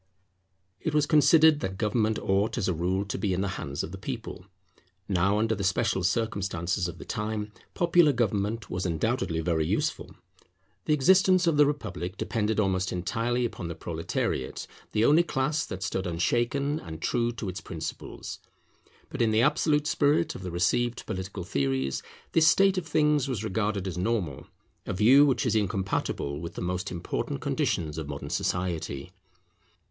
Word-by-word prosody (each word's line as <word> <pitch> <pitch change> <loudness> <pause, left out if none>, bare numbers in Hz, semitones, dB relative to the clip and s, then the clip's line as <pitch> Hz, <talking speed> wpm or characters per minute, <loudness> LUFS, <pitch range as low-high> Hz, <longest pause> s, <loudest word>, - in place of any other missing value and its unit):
It 155 - -2
was 150 -1 +4
considered 155 +1 +5
that 95 -5 -4
government 110 +1 +1
ought 100 +2 0
as 115 - 0
a 90 - +1
rule 90 +4 -1
to 100 - -4
be 100 -4 0
in 95 - -1
the 100 - -1
hands 70 +1 -4
of - - -6
the 95 - -8
people. 115 -5 -6 0.6
Now 95 +1 +2
under 110 +1 +1
the 100 -2 -3
special 95 +1 +1
circumstances 95 -3 -1
of 85 - -7
the - - -10
time 105 0 -3 0.2
popular 175 -3 +4
government 110 -2 -1
was 90 - -3
undoubtedly 85 0 -1
very 80 -1 +1
useful. - - -2 0.7
The 150 - +2
existence 185 +5 +4
of 165 -2 +3
the 145 -1 +6
republic 100 -10 -4
depended 110 -2 -1
almost 95 -2 +1
entirely 115 +7 -1
upon 100 -6 -5
the 85 - -5
proletariate, 80 -5 -3 0.3
the 110 +2 +2
only 150 +6 +6
class 150 -2 -1
that 95 +1 -5
stood 95 -1 -2
unshaken 120 - 0
and 80 - -8
true 120 +7 0
to 115 -3 -5
its 95 +1 -5
principles. 80 -4 -7 0.7
But - - -3
in 115 - +4
the 110 +2 +3
absolute 150 +1 +2
spirit 150 +1 +2
of - - -8
the 90 - -5
received 115 +8 0
political 95 0 -5
theories, 65 -4 -1 0.3
this 160 -1 +4
state 195 +3 +5
of 165 - -9
things 150 -3 +2
was 120 -6 -3
regarded 100 -2 -1
as 90 -1 -4
normal, 90 - -2 0.4
a - - -1
view 125 +9 +6
which 135 +1 +1
is 120 - +1
incompatible 95 -8 -1
with 85 +1 -7
the - - -5
most 90 +2 -2
important 85 -5 -3
conditions 80 -2 -1
of 75 -2 -6
modern 70 0 -6
society. 85 -4 -2
105 Hz, 170 wpm, -27 LUFS, 90-130 Hz, 0.7 s, the